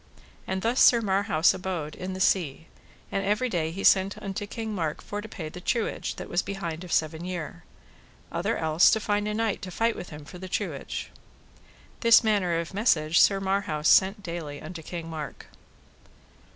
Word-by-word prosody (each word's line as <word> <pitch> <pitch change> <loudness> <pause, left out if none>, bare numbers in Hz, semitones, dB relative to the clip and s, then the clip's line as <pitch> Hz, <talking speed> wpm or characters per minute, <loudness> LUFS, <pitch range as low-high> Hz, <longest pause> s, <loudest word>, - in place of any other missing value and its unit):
And 190 0 -2
thus 235 +3 +2
Sir 240 - +7
Marhaus 195 -6 +2
abode 180 -5 -4
in 185 +1 -5
the 185 - -6
sea, 165 -5 +1 0.5
and 195 - -1
every 210 +6 +1
day 165 -6 -1
he 190 +4 -6
sent 195 +1 +4
unto 200 0 -5
King 220 0 -5
Mark 160 -6 -2
for 205 0 -5
to 220 - -9
pay 160 -6 -6
the 175 +3 -9
truage 230 +4 -1
that - - -7
was 175 - +1
behind 175 -4 -5
of 180 - -9
seven 160 +1 0
year, 175 - -5 0.7
other 180 +7 -1
else 160 +1 +4
to 220 - +3
find 205 -1 0
a 210 - -1
knight 225 -2 -1
to 190 - -6
fight 225 +5 0
with 180 - -7
him 150 -1 -10
for 180 +4 -11
the 185 0 -7
truage. - - -4 0.9
This 230 0 +6
manner 200 -6 +2
of 170 +2 -5
message 170 -6 +3
Sir 195 -1 +5
Marhaus 190 -6 -1
sent 195 +2 +4
daily 165 -5 -5
unto 165 +1 -8
King 165 +1 -6
Mark. 155 -4 -7
185 Hz, 185 wpm, -27 LUFS, 165-205 Hz, 0.9 s, Sir